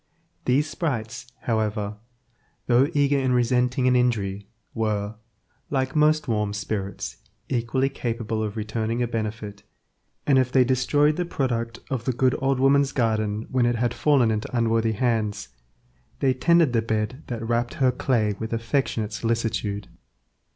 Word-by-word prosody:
These 140 +4 +2
sprites, 125 -7 -3
however, 105 -2 -1 0.7
though 125 +3 +4
eager 145 -3 +2
in 130 -1 +1
resenting 125 +1 +2
an 125 - +4
injury, 100 -5 0 0.2
were, 105 -2 -1 0.6
like 130 -1 -1
most 155 0 +3
warm 105 -3 0
spirits, 105 -1 -4 0.3
equally 130 +2 0
capable 115 -4 -3
of 110 0 -3
returning 110 +2 -1
a - - 0
benefit, 110 -3 -4 0.6
and 135 -2 +4
if 130 -1 +1
they 130 -1 +5
destroyed 145 +4 +2
the 180 - 0
product 115 -7 -2
of 125 -4 -2
the 130 - +1
good 130 +2 +2
old 135 -2 +1
woman's 140 +1 +3
garden 110 -3 0
when 125 -2 +3
it 120 - +1
had 120 +1 0
fallen 135 -7 +3
into 110 +3 -2
unworthy 115 -1 +2
hands, 105 - -1 0.7
they 135 -2 +3
tended 165 +1 +3
the 115 - +3
bed 110 +4 -2
that 115 -2 -4
wrapped 120 0 0
her 130 -2 +3
clay 115 -4 +1
with 110 +1 -4
affectionate 115 -2 -1
solicitude. 110 -3 -2
120 Hz, 145 wpm, -24 LUFS, 110-130 Hz, 0.7 s, they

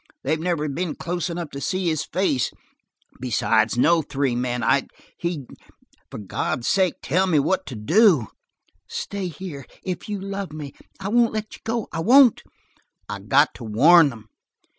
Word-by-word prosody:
They've 155 +3 0
never 165 -3 -1
been 160 +3 -3
close 175 -1 -3
enough 170 -3 -5
to 140 - -7
see 185 +2 -1
his 155 -2 0
face. 170 -8 0 0.7
Besides, 115 -2 +1
no 165 +6 +4
three 140 -4 -1
men 125 0 -2
I - - +2 0.3
he 170 -6 -4 0.6
for - - -8
God's 110 +3 -3
sake 190 -3 +2
tell 185 +6 +1
me 165 -4 +2
what 180 +7 +1
to 130 - -6
do!" 160 - +4 0.6
"Stay 200 -2 -4
here 165 -4 -7 0.2
if 185 +2 -5
you 205 -1 -3
love 195 -3 -5
me. 150 -3 -7 0.3
I 195 0 -4
won't 235 +1 +3
let 215 0 -4
you - - -17
go. 225 0 -2
I - - -4
won't!" 250 +6 +6 0.7
"I - - -5
got 135 +9 +3
to 125 - -11
warn 145 +9 +6
them." 115 -4 -11
165 Hz, 165 wpm, -23 LUFS, 135-190 Hz, 0.7 s, won't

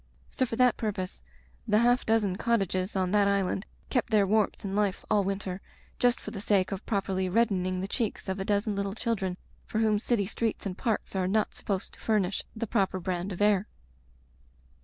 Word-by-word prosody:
So 255 - 0
for 225 - -3
that 250 -1 +4
purpose 190 - -3 0.5
the 210 - +4
half 245 +2 +3
dozen 215 -4 +2
cottages 195 -4 0
on 185 -1 +1
that 205 -1 +4
island 200 0 0 0.2
kept 250 -3 +1
their 210 -3 +4
warmth 210 +1 +1
and 195 0 -3
life 205 -2 0
all 210 -2 +4
winter, 195 -1 -3 0.4
just 245 0 +3
for - - -7
the 200 - -6
sake 200 -3 +2
of 195 0 -4
properly 190 -3 0
reddening 185 -3 +1
the 190 - -2
cheeks 220 -1 -2
of 190 +1 -2
a - - -1
dozen 205 +1 0
litde 200 +1 -2
children 195 -7 -1 0.3
for - - -3
whom 215 -2 +3
city 220 -2 +1
streets 225 +2 -2
and 190 -2 -3
parks 220 -2 -2
are 185 -1 +1
not 215 +3 +1
supposed 195 -2 -3
to - - -14
furnish 200 -4 +1
the 230 +1 -2
proper 195 -4 0
brand 180 +1 -2
of 185 +2 -1
air. 205 -1 +3
200 Hz, 195 wpm, -29 LUFS, 190-220 Hz, 0.5 s, that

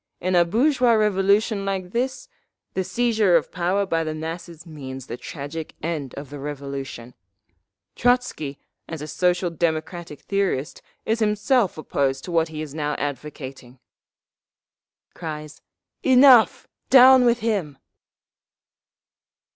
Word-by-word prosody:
In 185 +1 -1
a 175 -1 +5
bourgeois 245 - +3
revolution 210 0 +2
like 190 -2 -3
this…. 255 - -2 0.5
the 190 - -1
seizure 220 -4 +2
of 165 - +1
power 185 +3 0
by 165 -3 0
the 155 -1 -4
masses 165 +1 -7
means 135 -5 -8
the 120 - -6
tragic 150 +4 -7
end 155 -5 -3
of 140 -1 -8
the 145 - -7
Revolution…. 140 -4 -6 0.8
Trotzky, 245 - 0 0.3
as 160 -3 -6
a - - -6
Social 180 +1 0
Democratic 165 -1 -3
theorist, 195 -8 -2 0.2
is 225 +1 0
himself 210 - +1
opposed 135 -3 -1
to 180 - -7
what 165 -1 +2
he 155 -1 -6
is 145 -3 -9
now 150 -1 -2
advocating…." 135 -3 -6 1.4
(Cries, 155 -2 -7 0.4
"Enough! 260 -3 +6 0.2
Down 260 0 +8
with 240 0 +2
him!") 195 -11 -1
170 Hz, 125 wpm, -23 LUFS, 150-210 Hz, 1.4 s, Down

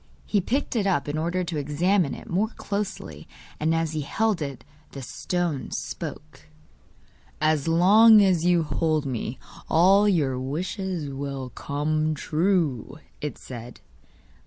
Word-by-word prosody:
He 205 - +1
picked 260 +8 -2
it 205 -4 +1
up 175 -8 +1
in 145 - -2
order 170 +4 -1
to 170 -2 -4
examine 160 +3 +1
it - - -11
more 195 +5 +1
closely, 195 - -5 0.3
and 160 +2 +1
as 165 -1 0
he 155 -1 -2
held 210 +5 0
it 140 -4 -5 0.3
the 135 - -7
stone 170 -1 -2
spoke. - - -7 0.9
'As 155 -1 +1
long 210 +7 +7
as 185 -5 +3
you 175 -1 +3
hold 155 -1 0
me, 125 -1 -3 0.3
all 195 +5 +5
your 140 -9 +1
wishes 175 +4 -3
will 135 -2 -5
come 155 +3 -1
true,' 155 - 0 0.2
it 150 - -4
said. 120 -1 -9
160 Hz, 135 wpm, -25 LUFS, 145-185 Hz, 0.9 s, long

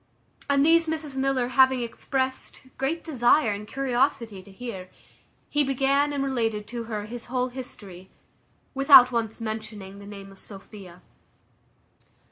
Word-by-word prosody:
And 280 0 +4
these 330 +1 +5
Mrs 310 -3 -3
Miller 265 -2 0
having 260 -1 +4
expressed 260 +2 -3 0.2
great 300 +5 -1
desire 250 -4 +3
and 205 +1 -5
curiosity 245 -5 -1
to 185 - -17
hear, 195 -3 -7 0.6
he 295 0 +2
began 275 +2 +1
and 280 -1 -1
related 225 -6 -1
to 235 0 -5
her 210 -2 -4
his 235 +2 -8
whole 250 +1 -1
history, 200 -8 -9 0.6
without 275 -2 +8
once 230 -2 -2
mentioning 215 -3 -6
the 200 - -11
name 200 -1 -10
of 195 - -15
Sophia. 195 -3 -12
245 Hz, 135 wpm, -25 LUFS, 210-270 Hz, 0.6 s, without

